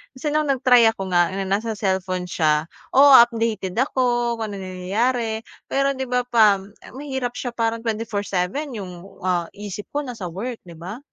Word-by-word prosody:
Kasi 295 +3 -3
no'ng 305 -1 +1
nag-try 250 -2 +5
ako 195 -3 -6
nga, 175 0 +3
na 195 0 -2
nasa 215 +3 -1
cellphone 185 -2 -1
siya, 155 -1 +1 0.3
oo, 280 +1 +8
updated 225 -5 -2
ako 240 -3 +1
kung 215 -2 -3
anong 195 -1 -6
nangyayari, 220 +5 -1 0.3
pero 275 0 +2
'di 265 - -2
ba, 250 0 +2
pam 205 -4 +3 0.2
mahirap 265 -3 -3
siya 245 - -4
parang 230 0 0
24/7 215 +3 -2
'yung, 185 -3 -6 0.3
ah, 175 -2 0
isip 205 0 -7
ko 290 - 0
nasa 225 -8 -6
work, 230 +6 -5
'di 170 - -11
ba? 190 +8 -7
220 Hz, 165 wpm, -22 LUFS, 190-250 Hz, 0.3 s, oo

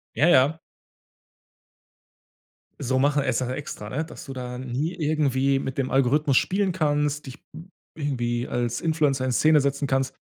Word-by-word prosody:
Ja, 155 - +3
ja. 145 0 +4 2.2
So 130 -1 0
machen 145 +1 +2
es - - 0
ja 125 -1 -2
extra, 130 -6 -6
ne? 155 +8 -2
Dass 170 - -11
du 135 - -7
da 125 -1 -6
nie 130 +6 -3
irgendwie 140 -4 +1
mit 135 0 -5
dem 135 -2 -1
Algorithmus 135 +1 +3
spielen 195 0 +1
kannst, 150 -3 0
dich 130 +2 -9 0.6
irgendwie 120 -5 -2
als 120 -1 -2
Influencer 150 -5 +1
in 130 - 0
Szene 155 +6 +4
setzen 140 +1 -1
kannst, 135 -1 0
140 Hz, 150 wpm, -25 LUFS, 130-150 Hz, 2.2 s, ja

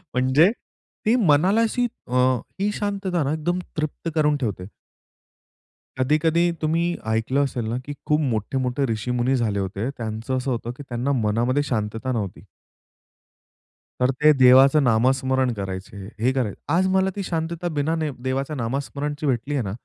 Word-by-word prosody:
म्हणजे 130 +9 +4 0.5
ती 225 - +4
मनाला 190 +1 +4
अशी 245 +2 +1 0.2
अ, 125 +1 -1 0.4
ही 205 +1 +1
शांतता 195 -5 -1
ना 140 +3 0
एकदम 175 +3 -1 0.2
तृप्त 155 +2 -3
करून 150 -2 +3
ठेवते. 105 -8 -3 1.3
कधी-कधी 160 +6 +2
तुम्ही 165 +2 +1 0.2
ऐकलं 115 +6 +1
असेल 125 -4 -3
ना - - -1
की 145 - -5
खूप 150 0 +3
मोठे-मोठे 130 +2 -1
ऋषीमुनी 125 +4 0
झाले 110 -5 0
होते. 100 +5 -3
त्यांचं 115 0 -4
असं 130 +1 -2
होतं 120 0 -3
की 145 - -8
त्यांना 125 +3 -1
मनामध्ये 120 +6 +1
शांतता 115 -1 -2
नव्हती. 100 -6 -4 1.6
तर 125 +1 +4
ते 155 0 +7
देवाचं 135 +3 +7
नामस्मरण 130 +2 +2
करायचे 95 -1 -6 0.2
हे 125 +3 +2
कराय 120 -7 -1 0.2
आज 190 +2 +3
मला 190 0 +3
ती 200 - -3
शांतता 170 0 -3
बिना 155 +3 +1
ने 155 -2 -1 0.2
देवाचं 135 +3 -2
नामस्मरणची 140 +5 -3
भेटली 135 +1 -1
आहे 135 -4 0
ना, 95 - -4
135 Hz, 150 wpm, -23 LUFS, 120-155 Hz, 1.6 s, ते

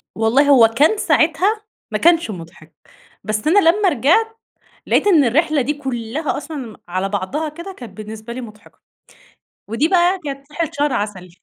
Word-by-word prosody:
والله 245 +6 +2
هو 245 -5 +7
كان 295 - +2
ساعتها 380 +6 +2 0.3
ما - - 0
كانش 335 -8 +3
مُضحك. 165 -3 -11 0.5
بس 215 +5 -2
أنا 390 +6 +5
لمّا 395 +2 +3
رجعت، 355 - +1 0.5
لقيت 415 - +2
إن 325 -8 +5
الرحلة 300 +4 +2
دي 290 +5 -1
كُلّها 265 +1 -4
أصلًا 295 +2 -7
م 230 -5 -8
على 185 +2 -2
بعضها 210 +11 -3
كده 340 +6 -9
كان 230 -6 -10
بالنسبة 220 +2 -8
لي 255 - -6
مُضحكة. 215 -2 -14 0.9
ودي 230 +9 0
بقى 360 +1 +2
كانت 275 +1 -7
رحلة 330 0 -3
شهر 290 -1 +1
عسل. 205 -3 -4
280 Hz, 165 wpm, -19 LUFS, 220-330 Hz, 0.9 s, هو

